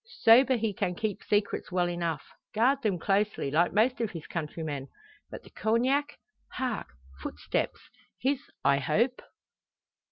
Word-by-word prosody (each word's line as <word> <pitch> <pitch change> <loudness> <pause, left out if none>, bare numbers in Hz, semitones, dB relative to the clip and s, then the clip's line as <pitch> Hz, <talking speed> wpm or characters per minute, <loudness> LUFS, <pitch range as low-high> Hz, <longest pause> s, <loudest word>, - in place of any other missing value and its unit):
Sober 255 +3 +7
he 220 -2 -1
can 180 -1 -1
keep 215 +1 -2
secrets 205 -2 0
well 180 -1 +2
enough 170 -4 -2 0.3
guard 260 +5 +3
them 205 -6 +1
closely, 195 -5 0
like 170 +4 +3
most 235 +3 +2
of 225 - 0
his 165 -4 -8
countrymen. 150 -4 -4 0.4
But - - -9
the - - -16
Cognac? 255 +6 +1 0.4
Hark 250 -4 -2 0.3
Footsteps! - - -2 0.4
His 270 +1 +1 0.3
I 140 0 +5
hope." 225 - +1
210 Hz, 135 wpm, -29 LUFS, 170-240 Hz, 0.4 s, Sober